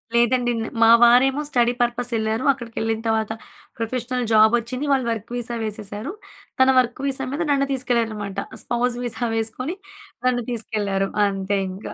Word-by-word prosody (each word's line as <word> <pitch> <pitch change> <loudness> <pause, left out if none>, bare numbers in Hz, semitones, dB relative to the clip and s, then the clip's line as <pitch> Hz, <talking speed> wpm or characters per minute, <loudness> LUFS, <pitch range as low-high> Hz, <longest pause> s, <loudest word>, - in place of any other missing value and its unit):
లేదండి, 240 +1 +3 0.3
మావారేమో 240 +4 +6
study 240 -2 +2
purpose 240 0 0
ఎళ్లారు. 220 +3 -1
అక్కడికి 235 -4 -11
ఎళ్ళిన 225 0 -1
తర్వాత, 220 -1 0 0.5
ప్రొఫెషనల్ 245 +2 -2
జాబ్ 215 +1 +6
వచ్చింది. 250 +5 -5
వాళ్ళు 260 -3 0
వర్క్ 225 +1 -5
వీసా 240 -1 -3
వేసేసారు, 215 - -5 0.5
తన 260 - +6
వర్క్ 245 0 0
వీసా 270 -1 -1
మీద 305 - -2
నన్ను 275 -1 +2
తీసుకెళ్లారు 245 -3 0
అన్నమాట. 205 -2 -5 0.2
స్పౌస్ 240 0 -1
వీసా 240 0 -2
వేసుకొని 230 +9 -2 0.5
నన్ను 245 -1 +1
తీసుకెళ్లారు 205 -4 -1 0.2
అంతే 195 0 -1
ఇంకా. 190 +3 -8
235 Hz, 145 wpm, -22 LUFS, 220-250 Hz, 0.5 s, మావారేమో